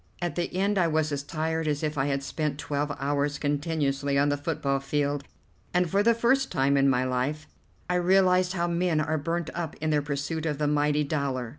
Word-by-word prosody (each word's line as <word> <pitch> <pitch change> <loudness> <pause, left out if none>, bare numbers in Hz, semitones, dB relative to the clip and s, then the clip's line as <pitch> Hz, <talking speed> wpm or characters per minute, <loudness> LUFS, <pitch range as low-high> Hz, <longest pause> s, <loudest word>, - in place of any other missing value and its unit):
At 175 -3 -2
the 175 +3 -2
end 200 +1 +1
I 175 - +3
was 155 -1 0
as 140 -1 -1
tired 160 +2 -2
as 150 0 -1
if 155 0 -1
I 135 0 0
had 140 -1 -1
spent 150 0 -2
twelve 145 0 -2
hours 145 +1 0
continuously 145 -2 0
on 145 +1 +3
the 145 - +2
football 145 -2 -1
field, 145 0 -1 0.5
and 180 0 +3
for 195 +5 +2
the 230 +2 +4
first 260 +4 +2
time 140 -3 +2
in 140 0 +4
my 125 -1 +2
life 130 +5 -2 0.4
I 180 - 0
realized 185 0 +3
how 170 -2 0
men 170 -2 +1
are 155 +1 0
burnt 165 +2 -2
up 170 -2 -4
in 155 0 -2
their 150 -1 +2
pursuit 145 +3 -3
of 150 -2 -1
the 150 - 0
mighty 150 0 +2
dollar. 140 -5 -2
150 Hz, 210 wpm, -27 LUFS, 140-170 Hz, 0.5 s, the